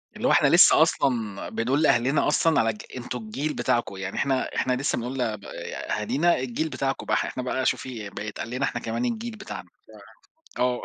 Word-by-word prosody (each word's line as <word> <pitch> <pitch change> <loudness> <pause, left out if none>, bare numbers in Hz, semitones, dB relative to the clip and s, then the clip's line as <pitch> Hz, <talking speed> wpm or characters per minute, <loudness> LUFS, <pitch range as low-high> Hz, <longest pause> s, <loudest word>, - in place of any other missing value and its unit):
اللي - - -1
هو - - +4
إحنا - - +5
لسّه - - +7
أصلًا 115 -7 +1
بنقول 130 +6 0
لأهلنا 135 -1 +3
أصلًا 160 +1 +3
على 115 0 +3
الج: 105 - -4 0.2
"أنتم 125 0 -5
الجيل 130 +8 -3
بتاعكم"، 120 -5 0
يعني 95 0 -5
إحنا 135 -2 0
إحنا 130 - +1
لسّه 135 +1 0
بنقول 125 +3 -4
ل 110 -3 0
ب 100 - -16 0.4
أهالينا 140 +11 +1
"الجيل 130 +5 -2
بتاعكم 135 -1 -2
بح،" - - +1
إحنا 130 - -4
بقى 130 +1 -1
شوفي 115 -6 -2
بقى 105 +2 -6
يتقال 105 +2 -5
لنا 130 +3 -1
إحنا 120 - -3
كمان 115 - -2
"الجيل 235 0 -3
بتاعنا." 210 -2 -8 0.9
ف - - -4
آه. 125 0 +1
125 Hz, 200 wpm, -25 LUFS, 115-140 Hz, 0.9 s, لسّه